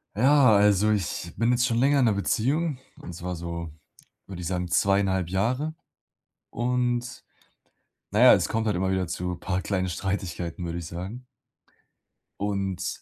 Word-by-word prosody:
Ja, 130 -1 +5
also, 105 +1 +4
ich 90 -4 -2
bin 115 +1 +2
jetzt 125 0 +2
schon 115 -3 0
länger 140 +3 +3
in 125 - +4
'ner 110 - +3
Beziehung. 135 +9 0 0.2
Und 90 - -8
zwar 90 +1 -5
so, 85 -1 -6 0.5
würde 95 -3 -8
ich 85 - -4
sagen, 90 0 -2
zweieinhalb 95 0 +1
Jahre. 125 - -1 0.8
Und, 125 0 -1 0.9
na - - +1
ja, - - +9
es - - 0
kommt 110 0 -1
halt 105 - +1
immer 95 +1 0
wieder 95 -1 0
zu 90 +1 -4
paar 90 +1 -3
kleinen 95 -2 -1
Streitigkeiten, 90 -2 -4
würde 85 0 -4
ich 85 - -6
sagen. 95 +10 -7 1.2
Und, 95 -2 -2
100 Hz, 155 wpm, -26 LUFS, 90-120 Hz, 1.2 s, ja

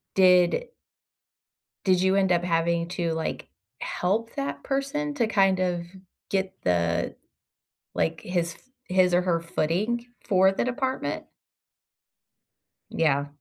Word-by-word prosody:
did 185 - +4 1.2
did 185 -2 +3
you 190 0 +3
end 190 -2 +3
up 175 0 +2
having 170 0 +1
to, 170 -2 -2
like, 160 0 -3 0.3
help 220 +6 -1
that 140 0 -4
person 280 +2 -2
to 240 -5 +1
kind 195 -3 +3
of 175 -2 0 0.5
get 190 -1 -1
the, 85 -2 0 0.8
like, 160 0 -1
his 170 -2 -2
f - - -21 0.3
his 185 -1 +3
or 180 - +4
her 170 -2 +1
footing 185 +9 -1 0.2
for 190 -2 +5
the 195 - -1
department? 260 +1 -2 1.7
Yeah. 145 -3 +1
180 Hz, 120 wpm, -26 LUFS, 170-200 Hz, 1.7 s, for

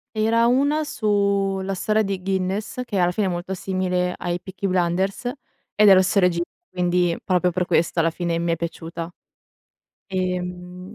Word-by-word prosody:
Era 225 +2 +3
1 285 +5 +2
su 200 -5 +1
la 195 +1 -2
storia 215 +3 +1
di 195 -2 -3
Guinness, 190 +5 -2
che 205 -5 -2
alla 175 -1 +4
fine 205 +3 0
è - - +1
molto 175 +2 -4
simile 180 -1 -1
ai 175 0 -3
Peaky 190 +2 -5
Blinders, 185 +4 0 0.5
ed 210 -1 +6
è 195 - +9
lo 185 - +5
stesso 195 +2 +2
regista, 175 -2 +2 0.2
quindi 175 -1 +1
proprio 180 -1 +2
per 180 +1 -1
questo 170 0 +1
alla 165 0 +3
fine 170 0 -2
mi 170 0 0
è - - +2
piaciuta. 165 0 -5 1.0
Ehm 180 0 -4
185 Hz, 170 wpm, -23 LUFS, 175-200 Hz, 1.0 s, è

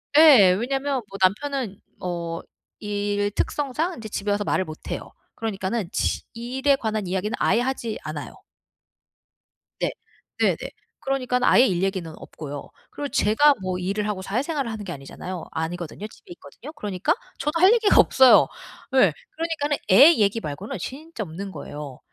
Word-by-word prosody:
예. 280 - +8
왜냐면 270 +6 -1
뭐 195 - -8
남편은 215 +1 0 0.2
어 170 -2 -3 0.4
일 205 0 -1
특성상 295 - -1
이제 220 -1 -7
집에 205 0 -3
와서 205 0 +1
말을 190 -2 0
못 155 -1 -9
해요. - - -5 0.2
그러니까는 210 -2 -2
지 - - 0
일에 260 +4 +1
관한 215 -6 -2
이야기는 190 +4 -2
아예 225 +5 +3
하지 245 -4 -2
않아요. 155 -1 -6 1.5
네. - - 0 0.5
네네. - - +3 0.4
그러니까 260 -2 -1
아예 250 - +6
일 185 -6 0
얘기는 190 -4 -2
없고요. 145 -2 -8 0.2
그리고 285 -1 -5
제가 280 +7 +4
뭐 185 -1 -2
일을 200 +3 -2
하고 195 -3 -3
사회생활을 260 - -2
하는 210 -2 -6
게 175 - -5
아니잖아요. 165 +6 -7
아니거든요. 175 +5 -4
집에 360 - -17
있거든요. 310 - -12
그러니까 195 - -1 0.3
저도 300 +4 -1
할 380 +5 +7
얘기가 445 -3 +4
없어요. 260 -1 +7 0.5
예. 195 -10 +6 0.2
그러니까는 310 -3 -1
애 280 - +9
얘기 210 -1 +2
말고는 180 +4 -5
진짜 275 - -6
없는 190 +3 -7
거예요. 145 -7 -8
210 Hz, 345 characters per minute, -24 LUFS, 185-270 Hz, 1.5 s, 애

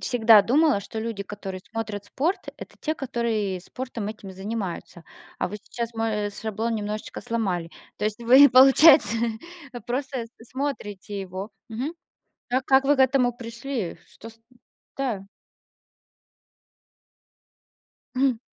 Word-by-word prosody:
всегда 225 -4 +6
думала, 290 0 +3
что 220 - -7
люди, 220 -2 -3
которые 195 -2 -7
смотрят 215 -3 -4
спорт- 325 - -2
это - - -11
те, 310 - -1
которые 230 - -2
спортом 240 +1 -6
этим 210 -2 -8
и - - -9
занимаются. 190 -4 -5 0.3
А - - -1
вы 210 - -6
сейчас 235 -1 -5
мой, 220 -2 -1
э, - - -8
шаблон 220 +2 -3
немножечко 210 0 -4
сломали. 195 -8 -2 0.3
То 210 - -3
есть 215 +2 -2
вы, 260 +5 +8
получается, 265 -2 +7 0.6
э, 245 - -7
просто 255 +2 -3 0.2
смотрите 225 -6 -5
его. 190 +3 -6 0.2
Мгм. 250 +8 -3 0.6
Как 255 +1 +1
как 270 0 +5
вы 290 +1 +4
к - - -13
этому 260 -2 +4
пришли? 230 -3 -5
Что 225 - -12
с 225 - -19
м, 235 +2 -29 0.4
да. 240 -8 -2 2.9
М. 260 -3 +2
230 Hz, 135 wpm, -25 LUFS, 205-260 Hz, 2.9 s, вы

